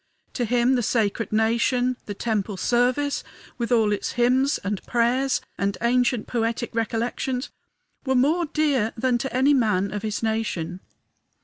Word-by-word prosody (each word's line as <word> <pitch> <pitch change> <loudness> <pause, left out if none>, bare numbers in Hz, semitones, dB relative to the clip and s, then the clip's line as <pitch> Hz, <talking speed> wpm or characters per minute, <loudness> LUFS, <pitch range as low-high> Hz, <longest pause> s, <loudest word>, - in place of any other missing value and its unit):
To 245 - -1
him 245 +2 +2
the 250 - +2
sacred 225 -1 0
nation, 235 +3 +2
the 205 - -5
temple 210 -2 -2
service, 250 +7 +1 0.4
with 235 +1 -2
all 220 -3 +3
its 205 - -2
hymns 255 +4 +2
and 200 -1 -2
prayers 250 +3 +1 0.2
and 200 0 0
ancient 240 -1 +1
poetic 230 0 -2
recollections, 235 +3 -2 0.5
were 265 -1 0
more 310 +7 +2
dear 285 -8 +1
than 245 0 +1
to 270 - -3
any 260 +3 +3
other 280 - +4
man 200 -4 +1
of 210 - -3
his 215 0 -3
nation. 220 -6 -2
240 Hz, 150 wpm, -24 LUFS, 220-255 Hz, 0.5 s, other